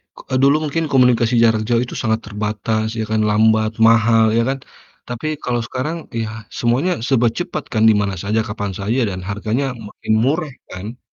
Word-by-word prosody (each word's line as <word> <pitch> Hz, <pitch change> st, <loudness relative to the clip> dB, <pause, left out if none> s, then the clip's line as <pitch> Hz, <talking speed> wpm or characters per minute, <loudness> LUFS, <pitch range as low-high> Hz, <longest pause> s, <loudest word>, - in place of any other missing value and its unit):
k -, -, -37 dB
eee, 130 Hz, -, +1 dB
dulu 140 Hz, +2 st, +5 dB
mungkin 165 Hz, +3 st, -1 dB
komunikasi 125 Hz, -2 st, +3 dB
jarak 110 Hz, -1 st, +3 dB
jauh 120 Hz, -1 st, +2 dB
itu -, -, -9 dB
sangat 110 Hz, 0 st, +1 dB
terbatas, 105 Hz, +1 st, -2 dB
ya -, -, 0 dB
kan, 110 Hz, 0 st, +2 dB
lambat, 110 Hz, 0 st, +3 dB, 0.2 s
mahal, 115 Hz, 0 st, +5 dB
ya 115 Hz, -, +3 dB
kan? 135 Hz, -, -1 dB, 0.5 s
Tapi 125 Hz, +5 st, -5 dB, 0.2 s
kalau 120 Hz, -1 st, -1 dB
sekarang 140 Hz, +6 st, -3 dB, 0.3 s
ya, 110 Hz, -, -3 dB, 0.3 s
semuanya 125 Hz, +10 st, +1 dB, 0.2 s
serba 125 Hz, -3 st, +3 dB
cepat 175 Hz, -4 st, -3 dB
kan, 110 Hz, 0 st, +2 dB
di -, -, +6 dB
mana 100 Hz, -1 st, -2 dB
saja, 110 Hz, +3 st, 0 dB
kapan 100 Hz, -1 st, -4 dB
saja, 110 Hz, +6 st, 0 dB
dan 95 Hz, -1 st, -5 dB
harganya 110 Hz, +7 st, -1 dB, 0.2 s
makin 110 Hz, -, -3 dB
murah 150 Hz, +2 st, 0 dB, 0.2 s
kan? 105 Hz, +7 st, -7 dB
115 Hz, 185 wpm, -19 LUFS, 110-130 Hz, 0.5 s, di